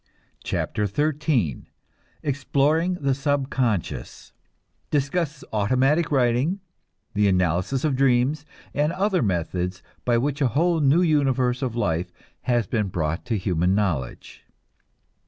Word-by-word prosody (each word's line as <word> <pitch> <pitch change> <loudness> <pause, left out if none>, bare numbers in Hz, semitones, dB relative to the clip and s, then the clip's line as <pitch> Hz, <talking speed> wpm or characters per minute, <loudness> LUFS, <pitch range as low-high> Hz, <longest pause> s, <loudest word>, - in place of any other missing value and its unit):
CHAPTER 105 - -1
XIII 145 - 0 0.6
EXPLORING 145 +4 +1
THE 140 -1 +2
SUBCONSCIOUS 135 - -2 0.6
(Discusses 150 +1 -1
automatic 130 +10 +2
writing, 130 +7 +2 0.5
the 105 0 +3
analysis 90 +7 +1
of 150 -4 +1
dreams, 135 +3 +2 0.3
and 150 +2 +1
other 190 -1 +1
methods 90 -1 -2 0.2
by 120 -1 +2
which 140 +4 -1
a 135 - +4
whole 170 +1 +3
new 150 +4 +4
universe 130 -6 +2
of 125 -4 -2
life 90 -6 -1 0.4
has 120 -2 +3
been 110 -4 -1
brought 85 -1 -2
to 115 -3 -1
human 90 -1 +1
knowledge.) 85 -12 -2
130 Hz, 115 wpm, -24 LUFS, 100-145 Hz, 0.6 s, a